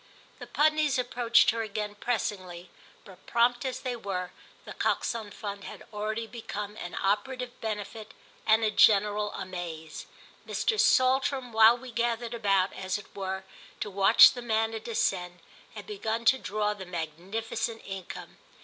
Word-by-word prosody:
The - - -8
Pudneys 305 -2 +2
approached 245 -2 +3
her 230 0 -2
again 210 -1 -4
pressingly, 185 -6 -3 0.3
but, 190 -2 -16
prompt 240 +1 +2
as 255 -1 -3
they 250 -1 -3
were, 190 -5 -4 0.3
The - - -8
Coxon 225 -3 -1
Fund 200 0 -7
had - - -9
already 215 +2 -2
become 210 -3 -6
an 175 - -6
operative 245 +5 -2
benefit 215 0 -5 0.3
and 220 +1 +5
a 215 - +2
general 210 0 +4
amaze: 170 -4 -6 0.4
Mr. 435 -2 0
Saltram, 260 - +3
while 225 +2 +7
we 250 0 -10
gathered 235 0 -1
about, 195 -4 +1
as 190 0 -3
it 205 - -14
were, 190 -1 -4 0.4
to 205 - -4
watch 195 0 +8
the 245 - -6
manna 225 -1 0
descend, 180 -6 -1 0.4
had - - -8
begun 230 - -3
to 265 +3 +5
draw 210 0 -1
the 190 -3 -9
magnificent 195 +7 -4
income. 195 -2 -8
215 Hz, 145 wpm, -28 LUFS, 195-235 Hz, 0.4 s, watch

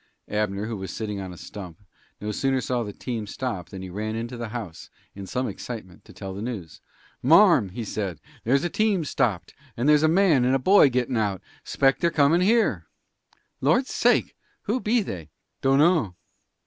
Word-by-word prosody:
Abner, 105 -1 -1
who 110 -1 -4
was 95 -1 -6
sitting 105 -3 -4
on 95 -1 -6
a 90 - -10
stump, 90 -4 -9 0.4
no 105 +1 -3
sooner 135 +4 0
saw 125 0 -1
the 105 -3 -4
team 110 0 -5
stop 110 -6 -4
than 95 -1 -8
he 95 - -7
ran 110 +3 -3
into 120 +2 -4
the 120 -1 -5
house, 105 -8 -7 0.2
in 100 -1 -8
some 125 +4 -2
excitement, 100 -8 -8
to - - -14
tell 95 -1 -7
the 100 - -6
news. 105 -10 -6 0.4
"Marm," 165 - +6
he 115 +6 -6
said, 95 -6 -4 0.2
"there's 135 +4 +2
a 175 - 0
team 210 -6 +1
stopped, 115 - -1 0.2
and 120 +4 0
there's 150 -1 +6
a 155 - +4
man 165 -6 +4
and 130 +1 +2
boy 195 -6 +6
gettin' 125 -1 -1
out; 100 -4 0 0.2
'spect 135 -1 +1
they're 170 - +3
coming 155 +2 +3
here." 195 - +2 0.7
"Lord's 165 - +2
sake! - - +2 0.3
Who 225 +5 0
be 230 0 +1
they?" 85 - -7 0.3
"Dunno." 135 - +3
120 Hz, 185 wpm, -25 LUFS, 100-145 Hz, 0.7 s, Marm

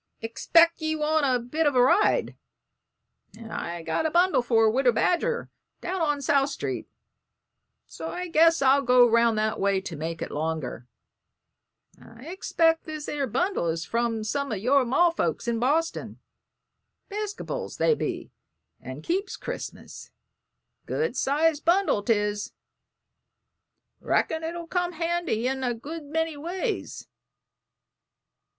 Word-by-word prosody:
"'Xpect 330 +10 +3
ye 315 0 -1
want 310 -1 +1
a 255 -1 +3
bit 290 +7 -1
of 285 - +1
a 250 - +5
ride, 340 +11 +3 1.0
and 225 -1 -10
I've 170 -1 -5
got 320 - 0
a - - -1
bundle 350 -1 +3
for 225 -2 +3
Widder 245 +3 +3
Badger, 470 - 0 0.3
down 365 0 -3
on 295 -3 0
South 275 +1 +2
Street, 280 - -4 1.0
so - - -7
I 360 +1 -4
guess 330 -2 +4
I'll 270 +1 +5
go 250 -2 +5
'round 230 -1 +3
that 215 +1 0
way 195 -1 +2
to 175 -3 -7
make 165 +2 -4
it - - -7
longer. 150 -5 -4 1.1
I 255 +10 -10
'xpect 325 -3 +1
this 310 -2 -6
'ere 285 -2 -2
bundle 300 - 0
is 165 0 -2
from 230 -1 -1
some 280 +5 -2
of 215 - -1
your 260 +7 +3
ma's 335 +8 +3
folks 170 - -2
in 235 -1 0
Boston 310 +7 -1 0.9
'Piscopals 415 0 -5
they 470 - +3
be - - -4 0.5
and - - -9
keeps 375 +3 -2
Christmas. - - -8 0.8
Good 470 +1 -1
sized 300 +2 +1
bundle 350 - +2
'tis; 205 -1 -1 1.5
reckon 320 0 0
it'll 335 +1 -4
come 355 +1 -1
handy 335 -8 -1
in 265 0 -2
a 245 -2 0
good 305 +6 -8
many 320 +2 -2
ways." 365 +9 -4
280 Hz, 135 wpm, -26 LUFS, 230-330 Hz, 1.5 s, a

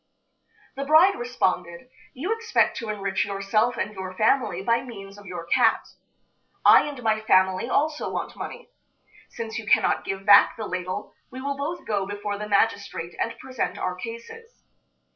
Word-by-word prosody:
The 275 - -3
bride 315 +7 +6
responded: 185 -6 -2 0.3
"You 345 - -1
expect 455 0 +1
to 230 - -5
enrich 200 -2 -1
yourself 205 +5 0
and 210 - -2
your 190 -2 -7
family 215 -4 +1
by 230 +3 +2
means 200 -6 -10
of 200 - -14
your 175 -2 -6
cat. 225 +6 +2 0.8
I - - +7
and 280 -4 -7
my 220 -1 +2
family 190 +1 +2
also 300 +3 0
want - - -4
money. 485 +1 -8 0.6
Since 230 0 -5
you 220 - -9
cannot - - +3
give 195 0 -5
back 205 - +7
the 220 - -4
ladle, 185 +1 -5 0.2
we 255 - -9
will 280 +1 -3
both 290 +5 -4
go 200 -3 -1
before 205 0 -4
the 210 0 -5
magistrate 200 -5 0
and 230 - -2
present 260 -1 -4
our 185 - -2
cases. 235 - -10
215 Hz, 160 wpm, -25 LUFS, 195-255 Hz, 0.8 s, I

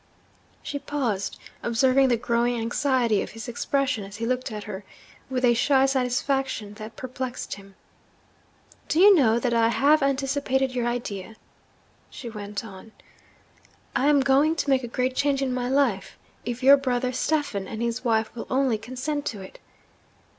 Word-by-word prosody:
She 285 - -4
paused, 240 -10 -2 0.2
observing 260 +3 +3
the 240 -2 +2
growing 235 +1 0
anxiety 235 -2 +1
of - - -6
his 225 -1 -8
expression 250 -1 -1
as 195 +1 -10
he 230 - -3
looked 255 +1 -1
at 210 -1 -5
her, 205 -1 -7 0.5
with 255 -1 0
a 240 - +5
shy 265 +3 +3
satisfaction 265 -4 -1
that 215 +1 -8
perplexed 255 0 -5
him. 195 -1 -12 1.1
'Do 320 - +1
you 405 +2 +9
know 235 -8 +4
that 240 0 0
I 230 -1 +4
have 285 +6 +3
anticipated 270 -1 0
your 245 -1 -1
idea?' 225 -4 -4 0.7
she 245 -5 -8
went 205 0 -6
on. 210 +1 -12 1.0
'I 265 +3 +2
am 295 -1 +5
going 275 +4 +3
to 295 -3 -1
make 265 -1 +3
a - - -4
great 255 +2 -1
change 280 -1 +1
in 260 -2 -1
my 250 0 -2
life 265 -8 0 0.3
if 240 +2 -4
your 275 +2 +8
brother 255 -2 -1
Stephen 255 -8 -1
and 220 - -6
his 235 +1 -2
wife 225 -2 +1
will 235 - -6
only 260 -4 +1
consent 255 +6 -4
to 205 -4 -4
it.' 190 - -13
250 Hz, 165 wpm, -25 LUFS, 225-270 Hz, 1.1 s, you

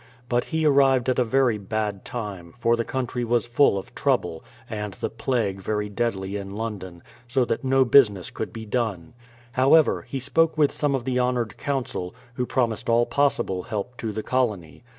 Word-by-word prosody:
But 120 0 +1
he 160 -1 -1
arrived 135 -3 +4
at 130 - +1
a - - +5
very 120 -2 +2
bad 105 -1 -3
time, 100 -8 -6
for 115 -1 +3
the 115 - -1
country 125 0 -3
was 120 0 +1
full 120 -2 +3
of 95 - -7
trouble, 80 - 0 0.2
and 105 -2 -5
the - - -4
plague 110 -4 -1
very 105 +1 -2
deadly 100 -3 -2
in 100 0 -7
London, 95 -6 -6 0.2
so 125 +1 +2
that 115 +3 -2
no 130 0 +3
busi 130 -1 +7
ness 95 -4 -8
could - - -5
be 110 0 -7
done. 105 -6 -2 0.4
However, 135 +5 +4
he 135 - -5
spoke 160 +5 +2
with 150 -2 +4
some 145 -2 0
of 125 -3 -3
the 125 -1 0
honoured 125 -4 0
Council, 130 -10 -3 0.2
who 125 +1 -2
promised 120 -3 0
all 120 +1 +4
possible 135 -11 +1
help 110 +4 -5
to 110 - -3
the 110 +1 -4
colony. 110 -10 -1
120 Hz, 190 wpm, -24 LUFS, 105-130 Hz, 0.4 s, busi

